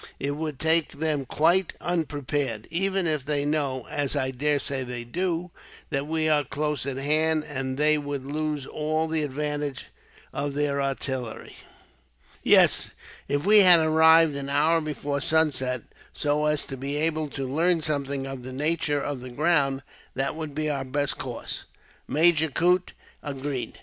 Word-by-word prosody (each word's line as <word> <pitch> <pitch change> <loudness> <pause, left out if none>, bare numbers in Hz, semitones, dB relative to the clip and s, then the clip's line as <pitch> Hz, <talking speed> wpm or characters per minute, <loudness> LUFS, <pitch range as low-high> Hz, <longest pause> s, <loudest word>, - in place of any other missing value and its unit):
It 140 - -1
would 150 -1 -4
take 160 +2 +1
them 150 -2 -1
quite 175 +6 +2
unprepared, 145 -8 -2
even 190 +2 0
if 155 -4 0
they 145 0 0
know, 140 -4 -1
as 145 -2 -2
I 130 0 0
daresay 140 0 -1
they 120 -1 -5
do, 175 +6 -2 0.4
that 140 +1 -1
we 160 0 0
are 150 -2 +3
close 150 0 -2
at 135 -1 -3
hand; 155 +3 +1
and 130 -2 -3
they 150 +1 +3
would 145 -2 -5
lose 150 0 -2
all 155 +2 -1
the 160 0 0
advantage 145 -1 -3 0.4
of 140 0 -3
their 145 -1 0
artillery." 130 -3 -4 0.9
"Yes, - - +5 0.4
if 145 +3 -1
we 210 +1 +7
had 180 -4 +8
arrived 160 -1 +5
an 140 0 -4
hour 155 +4 +3
before 145 -2 -3
sunset, 140 -6 +1 0.3
so 150 0 0
as 150 -1 +1
to 135 - -7
be 140 +2 -4
able 155 0 0
to 135 -1 -4
learn 165 +5 +2
something 140 -2 -2
of 135 -1 -6
the 130 +1 -8
nature 150 0 0
of 145 -3 -3
the 125 +1 -8
ground, 140 -1 +1 0.3
that 135 +2 -1
would 155 -3 -6
be 155 0 -1
our 140 -3 -1
best 140 +1 -2
course," - - -6 0.4
Major 160 0 +4
Coote 180 +5 +1 0.3
agreed. 140 -2 -5
145 Hz, 160 wpm, -26 LUFS, 135-160 Hz, 0.9 s, had